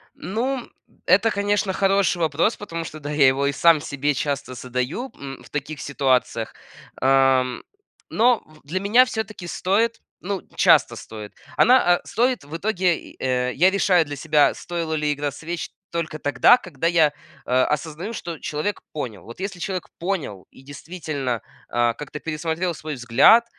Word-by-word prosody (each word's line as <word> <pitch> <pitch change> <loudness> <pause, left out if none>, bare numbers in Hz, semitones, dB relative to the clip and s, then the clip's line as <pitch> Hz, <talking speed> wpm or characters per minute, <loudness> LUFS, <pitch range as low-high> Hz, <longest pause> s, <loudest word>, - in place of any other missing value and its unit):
Ну! 245 +5 -3 0.4
Это, 200 +5 +5
конечно, 205 -1 0
хороший 195 -1 +2
вопрос, 165 +6 +1
потому 165 -5 -5
что 155 -1 -8
да, 145 0 -5
я 145 -2 +4
его 135 +1 +3
и 140 - +1
сам 165 +1 +5
себе 145 0 -1
часто 140 -2 -3
задаю, 125 - -3
м, 135 -1 -8
в - - -16
таких 145 +1 -5
ситуациях. 130 -5 0 0.5
О, 135 -1 +4 0.7
но 240 0 +3
в 155 0 -20
для 160 +7 -2
меня 215 +7 +5
всё-таки 210 -6 -5
стоит, 205 +6 0 0.2
ну 195 0 -3
часто - - +4
стоит. 105 -2 -9 0.2
Она, 245 -8 +5
а, - - -8
стоит 245 - 0
в 145 +3 -10
итоге, 185 -2 0
э, 125 -1 0
я 180 +7 +5
решаю 185 -3 +3
для 145 -1 -6
себя, 150 +1 +3
стоило 170 -2 -4
ли 150 -1 0
игра 145 0 -2
свеч 170 +4 -5 0.2
только 165 -2 -3
тогда, 145 +11 +5
когда 165 - -5
я 165 -3 +4 0.3
о 130 +1 +2
осознаю, 160 +8 -3
что 170 -6 -6
человек 155 +7 -3
понял. 115 - -5
Вот 120 +8 -11
если 195 -1 -4
человек 185 +1 -4
понял 165 - -3
и - - -17
действительно, 145 -4 -4 0.3
о, 120 0 +2
как-то 150 +5 -8
пересмотрел 160 +3 -2
свой 155 -1 -6
взгляд, 125 - +5
160 Hz, 160 wpm, -23 LUFS, 140-190 Hz, 0.7 s, Это